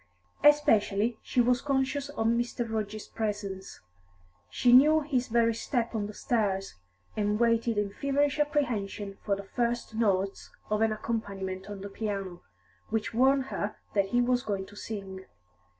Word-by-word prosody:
Especially 225 -6 +4
she 250 - +1
was 245 +1 +2
conscious 275 0 0
of 225 -6 -3
Mr. 235 +1 0
Rudge's 215 -1 -3
presence; 205 -3 -4 0.7
she 245 - +3
knew 305 +5 +7
his 265 -4 -1
very 230 0 +3
step 235 +1 -2
on 210 -2 -1
the 210 - -8
stairs, 195 -5 -1 0.4
and 210 0 0
waited 230 -1 +2
in 205 -1 0
feverish 280 +3 0
apprehension 220 -9 -1
for 200 - +1
the 200 - -7
first 235 +2 -2
notes 200 -3 0 0.2
of 210 0 +1
an 225 0 +3
accompaniment 200 -4 -4
on 200 -2 -7
the 200 - -5
piano, 195 -4 -4 0.5
which 220 0 -1
warned 265 +3 +4
her 205 +1 -2 0.2
that 200 -2 +3
he 240 +5 +1
was 245 0 +2
going 200 -4 -3
to 205 - -15
sing. 195 -3 -6
220 Hz, 150 wpm, -29 LUFS, 200-245 Hz, 0.7 s, knew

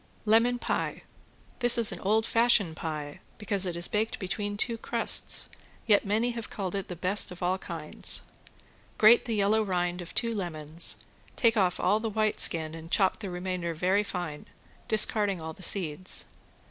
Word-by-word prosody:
~LEMON 230 +3 +3
PIE~ - - -4 0.6
This 240 -2 +4
is 230 -2 +1
an - - -7
old 220 +3 0
fashion 230 -8 +2
pie, 150 -2 -6 0.2
because 200 -3 -2
it 175 - -4
is 170 0 +1
baked 215 +1 -2
between 205 +2 -5
two 230 +1 -2
crusts, 230 0 +1 0.4
yet 205 -2 +2
many 220 +4 0
have 230 -2 -7
called 190 -3 -5
it 195 -1 -4
the 180 - -7
best 185 +4 +1
of 180 0 -9
all 185 +2 0
kinds. 165 -4 -2 0.8
Grate 220 +2 +5
the 230 -2 -3
yellow 210 +2 +1
rind 180 -3 -2
of 175 - -11
two 230 -1 0
lemons, 165 -5 +5 0.3
take 230 -1 +2
off 185 -4 0
all 200 +4 +1
the 225 0 -4
white 215 0 -1
skin 160 -1 +1
and 165 0 -10
chop 190 0 +1
the 205 -3 -6
remainder 180 -1 -4
very 185 +5 +1
fine, 175 -6 -7 0.4
discarding 210 -3 +2
all 160 0 -7
the 185 - -17
seeds. 180 -2 0
195 Hz, 170 wpm, -27 LUFS, 175-220 Hz, 0.8 s, Grate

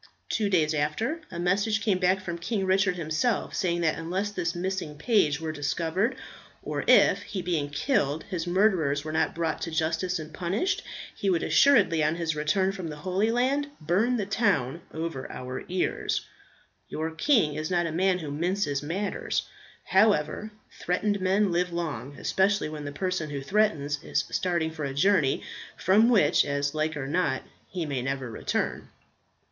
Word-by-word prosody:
Two 210 -2 0
days 160 -5 +2
after, 185 - -1
a 170 - -7
message 200 +5 +1
came 205 -4 +1
back 185 +1 +2
from 175 -2 -5
King 195 +2 -1
Richard 190 0 +2
himself, 165 +8 -1
saying 175 -2 0
that 160 -1 +1
unless 185 +5 -2
this 175 -3 -2
missing 180 -4 -3
page 155 - +2
were 160 -1 -3
discovered, 165 - -1 0.5
or - - -3
if, - - +6
he 190 -3 -5
being 165 -5 -1
killed, 145 - 0
his 180 -3 -4
murderers 175 -7 +2
were 155 - -3
not 160 - 0
brought 165 -2 -1
to - - -3
justice 165 +3 0
and 155 -1 -8
punished, 190 - -1 0.3
he 200 - -1
would 175 -3 +1
assuredly 165 - +4
on 155 +2 +2
his 165 -2 -2
return 185 +6 +1
from 185 -3 -6
the 155 - -6
Holy 185 +7 0
Land 260 +5 +1
burn 205 +11 +1
the 205 - -1
town 180 - 0
over 160 -4 -5
our 125 0 -6
ears. 180 0 -1 0.7
Your 160 +1 -3
king 165 - +2
is 155 +1 -3
not 175 -1 +1
a 165 - -2
man 185 +3 +2
who 155 -5 -6
minces 170 -1 -1
matters. 185 +7 -2 0.4
However, 195 -1 +2 0.3
threatened 200 +3 0
men 190 +1 +2
live 175 +1 0
long, 145 -6 -4
especially 195 -3 +1
when 150 -1 -6
the 145 - -4
person 180 0 -2
who 140 -2 -4
threatens 150 -5 +1
is - - 0
starting 170 -3 0
for 155 -1 -6
a 135 -1 -3
journey, 155 -4 +3 0.3
from 210 +6 +4
which, 200 -12 +4
as 140 0 -1
like 155 0 -1
or 140 - -3
not, 145 -2 0 0.3
he 180 -3 -3
may 140 -4 -2
never 135 -1 -3
return. 110 - -2
170 Hz, 170 wpm, -27 LUFS, 155-195 Hz, 0.7 s, if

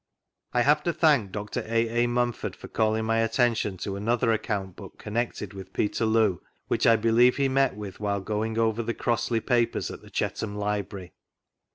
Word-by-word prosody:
I 125 - +2
have 150 +3 +4
to 170 - +1
thank 145 - +3
Dr. 105 0 -4
A. 115 +1 +1
A. - - +2
Mumford 120 -1 -1
for - - -11
calling 110 0 0
my 115 0 +1
attention 115 -3 +1
to 100 - -3
another 115 +3 +1
account 105 -4 -2
book - - -11
connected 115 0 -3
with 95 -1 -10
Peterloo, 110 -3 +1 0.3
which - - +1
I 115 - +7
believe 115 +3 +4
he 140 -1 +2
met 135 -4 +2
with 105 -2 -8
while 100 -1 -1
going 110 +3 -2
over 115 0 +1
the 115 0 -3
Crossley 115 -1 0
pi^>ers 120 0 0
at - - -10
the - - -15
Chetham 105 -2 -3
Library. 100 -3 -3
115 Hz, 180 wpm, -26 LUFS, 105-120 Hz, 0.3 s, I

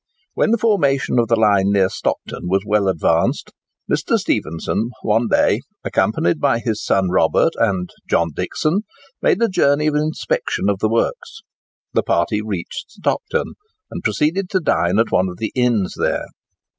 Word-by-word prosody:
When - - +1
the 230 - +3
formation 145 - +1
of 115 - +2
the 115 - +3
line 100 -2 +3
near 100 -2 +3
Stockton 90 - -4
was 95 +2 +1
well 105 -1 +1
advanced, 95 -4 +1 0.4
Mr. - - +1
Stephenson 85 +8 -2
one 115 +2 +2
day, - - +3 0.2
accompanied 85 -3 +1
by 115 - +2
his 115 -2 -3
son 95 -2 +1
Robert 90 - +3
and 95 -5 0 0.2
John 85 0 +2
Dixon, 165 +7 -1 0.4
made 225 - +2
a - - +4
journey 150 -6 +2
of 155 - +1
inspection 155 - -1
of - - -4
the - - +1
works. 480 -3 -2 0.5
The - - +3
party - - 0
reached - - -5
Stockton, 475 0 -2 0.4
and - - -6
proceeded 180 +5 0
to 190 - +1
dine 85 - +1
at 115 +1 +2
one 95 +1 +2
of 90 - -9
the 110 - -3
inns 120 -7 +1
there. - - -1
115 Hz, 160 wpm, -19 LUFS, 95-155 Hz, 0.5 s, a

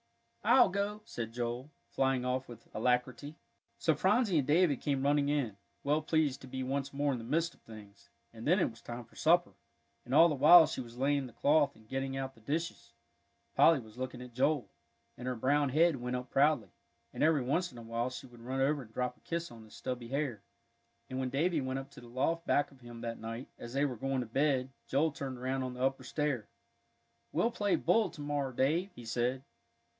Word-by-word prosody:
"I'll 245 -1 +6
go," 200 +2 -2
said 115 -2 -5
Joel, 120 +3 -3 0.2
flying 135 -2 +1
off 130 +1 -1
with 115 -1 -12
alacrity. 125 +5 0 0.4
So 160 - +2
Phronsie 190 - +3
and 135 - -1
David 155 -2 +3
came 140 -2 0
running 145 0 +3
in, 135 -8 0 0.3
well 150 +2 +2
pleased 155 -3 +1
to 130 - -10
be 130 0 -4
once 135 +1 -2
more 145 0 0
in 125 - -3
the - - -7
midst 165 +7 0
of - - -25
things; 105 -3 -14 0.2
and 115 +2 -7
then 180 +5 +5
it - - +3
was 115 - -16
time 120 0 -7
for - - -24
supper, 175 +2 +3 0.5
and 130 - -2
all 165 - +9
the 160 - 0
while 155 +4 +9
she - - -4
was 120 -1 -11
laying 140 0 +1
the - - -12
cloth 145 -1 +3
and 110 -1 -20
getting 135 +2 -3
out 135 0 -4
the 115 - -21
dishes, 160 +8 -3 0.6
Polly 165 -4 +6
was 110 0 -13
looking 130 -1 -4
at 125 -1 -12
Joel, 130 -3 +1 0.4
and 125 - -7
her 130 - -1
brown 140 +4 +2
head 160 +2 +4
went 125 0 -3
up 125 0 -5
proudly, 135 - +3 0.4
and - - -5
every 155 -4 +4
once 170 +8 0
in 120 - -13
a 115 - -8
while 115 +2 -2
she 130 +2 -8
would 120 -2 -15
run 130 +3 -3
over 145 +1 +2
and 115 -4 -13
drop 125 +1 -2
a - - -26
kiss 170 -1 -4
on 115 -1 -12
his 110 - -15
stubby 125 -2 -4
hair. 135 -5 -2 0.7
And 130 - -2
when 130 -1 -1
Davie 155 +4 +1
went 130 0 -2
up 135 +1 -7
to 140 - -12
the 120 - -12
loft 145 +8 -1
back 145 - +2
of 135 -2 -19
him 120 -1 -10
that 115 -1 -4
night, 115 +3 -6
as 120 - -8
they 140 +2 +2
were 130 -3 -2
going 135 +2 -1
to - - -4
bed, 135 +2 +1 0.2
Joel 155 +4 +2
turned 135 -3 -5
around 130 +2 -2
on 130 -1 -4
the 125 - -3
upper 135 0 0
stair. 140 -5 -2 0.8
"We'll 175 +10 +1
play 205 -4 +1
bull 225 -2 +2
to 150 - -10
morrow, 145 -2 -1
Dave," 155 +10 +1
he 120 - -10
said. 125 +3 -1
135 Hz, 220 wpm, -32 LUFS, 125-150 Hz, 0.8 s, all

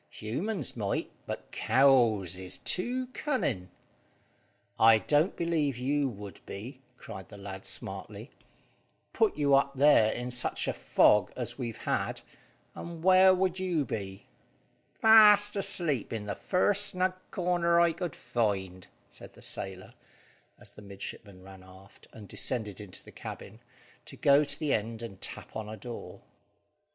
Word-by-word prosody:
Humans 180 - -3
might, 105 -4 -2 0.2
but - - -6
cows 120 -9 +3
is 95 0 -6
too 250 +7 -1
cunning." 130 - -2 1.1
"I 110 0 +7
don't 150 - +1
believe 160 -6 0
you 140 +2 0
would 100 -3 -10
be," 125 +7 -8 0.2
cried 95 -4 -10
the 105 - -11
lad 95 -1 -8
smartly. - - -6 0.8
"Put 220 -7 +2
you 145 -2 +2
up 140 0 +3
there 135 -6 +5
in 125 +1 -4
such 125 0 -1
a - - 0
fog 90 +11 +3
as 125 +2 -6
we've 120 -3 -4
had, - - -2 0.5
and 170 -1 -8
where 185 0 +7
would 185 0 +1
you 175 -6 0
be?" 100 -4 -6 0.7
"Fast 210 -2 +7
asleep 175 - -2
in 110 -2 -4
the 100 - -3
first 200 - +1
snug 185 -1 0 0.2
corner 175 -1 +1
I 170 -1 +4
could 170 -2 -5
find," 95 -5 -2 0.2
said - - -13
the - - -14
sailor, 95 -1 -6 0.6
as - - -13
the - - -14
midshipman 100 -1 -9
ran 95 0 -13
aft, 95 +1 -17
and 105 -3 -12
descended 105 -4 -1
into 100 -3 -10
the - - -14
cabin, 110 - -9 0.5
to - - -11
go 145 -2 +5
to 145 - -1
the 155 -3 0
end 115 +2 -2
and 100 -5 -9
tap - - -7
on 110 -1 -5
a 110 - -7
door. 120 0 -9
125 Hz, 145 wpm, -29 LUFS, 105-170 Hz, 1.1 s, I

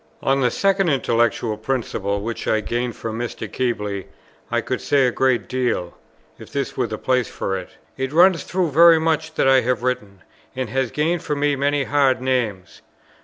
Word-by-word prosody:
On 135 0 +2
the 125 - +3
second 195 +5 +1
intellectual 120 -4 +1
principle 110 -4 -2
which 115 +2 -5
I 110 - +2
gained 120 +2 -3
from 115 0 -5
Mr. 120 -1 -4
Keble, 105 -6 -2 0.4
I - - +1
could - - -3
say 140 -2 +3
a 125 - +2
great 130 -2 +1
deal; 120 -9 -2 0.4
if - - -12
this - - -3
were - - 0
the - - -5
place 125 -2 0
for 95 - -3
it. 95 -1 -6 0.3
It 130 0 -2
runs 175 +2 +5
through 180 -4 -1
very 165 +3 +7
much 160 0 -1
that - - +2
I 135 -1 +6
have 125 0 -1
written, 105 -7 -3 0.3
and 130 -4 -3
has 130 -1 0
gained 160 +5 0
for 160 -3 -2
me 145 0 +1
many 140 +1 +1
hard 140 -1 +2
names. 120 -8 -2
130 Hz, 185 wpm, -21 LUFS, 115-145 Hz, 0.4 s, very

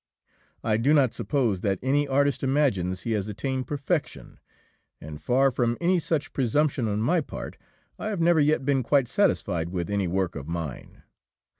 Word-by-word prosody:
I 110 -1 +1
do 140 +7 +3
not 130 -6 +3
suppose 115 -8 -1
that 100 -2 0
any 145 +2 +2
artist 140 +1 +1
imagines 100 - 0
he 115 - -3
has 105 -2 -1
attained 130 +4 -3
perfection, 145 +3 -3 0.6
and, 75 -1 -9
far 130 - +3
from 120 -1 0
any 175 +1 +2
such 160 -2 -2
presumption 135 0 +1
on 105 0 -1
my 165 +9 +2
part, - - -7 0.4
I - - -4
have 210 -4 -2
never 170 -1 +4
yet 150 -2 +2
been 135 -2 +2
quite 135 +1 +2
satisfied 100 - 0
with 90 +1 -3
any 100 -2 0
work 90 0 -1
of 70 -1 -7
mine. 80 -5 -6
130 Hz, 170 wpm, -26 LUFS, 100-145 Hz, 0.6 s, never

